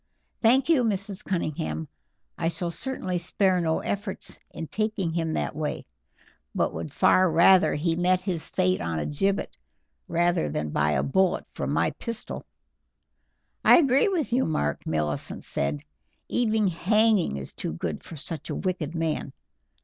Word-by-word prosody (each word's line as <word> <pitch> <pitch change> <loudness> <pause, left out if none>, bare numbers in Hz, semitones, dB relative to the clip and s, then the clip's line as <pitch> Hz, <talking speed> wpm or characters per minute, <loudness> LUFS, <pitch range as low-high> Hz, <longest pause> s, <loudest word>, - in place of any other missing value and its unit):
"Thank 250 +4 +4
you, 315 -7 +4
Mrs. 200 -3 -2
Cunningham; 80 - -2 0.5
I 165 - -1
shall 170 0 -3
certainly 185 -2 -2
spare 185 +1 +1
no 160 -1 0
efforts 200 -1 -4
in 165 - -6
taking 210 -3 -2
him 165 -1 -1
that - - -2
way, 155 0 -3 0.7
and - - +1
would 80 0 -5
far 185 -1 +4
rather 175 +3 +5
he 165 +2 0
met 180 +1 +2
his 180 -4 -2
fate 90 0 +1
on 85 -1 -2
a 75 - -2
gibbet 195 +7 -1 0.5
than 165 - 0
by 75 0 +1
a 65 - +1
bullet 190 +5 +1
from - - -3
my - - +2
pistol." 230 0 -6 1.2
"I - - +8
agree 275 - +4
with 335 -10 -1
you, 260 +2 +3
Mark," 75 - -1
Millicent 75 -2 -1
said; 70 +1 -1 0.4
"even 220 -3 +1
hanging 200 - +2
is 65 - -7
too - - -4
good 80 -1 -4
for 165 - -9
such 160 +1 -6
a - - -2
wicked 175 -4 -2
man. 160 -4 -2
175 Hz, 150 wpm, -26 LUFS, 140-205 Hz, 1.2 s, I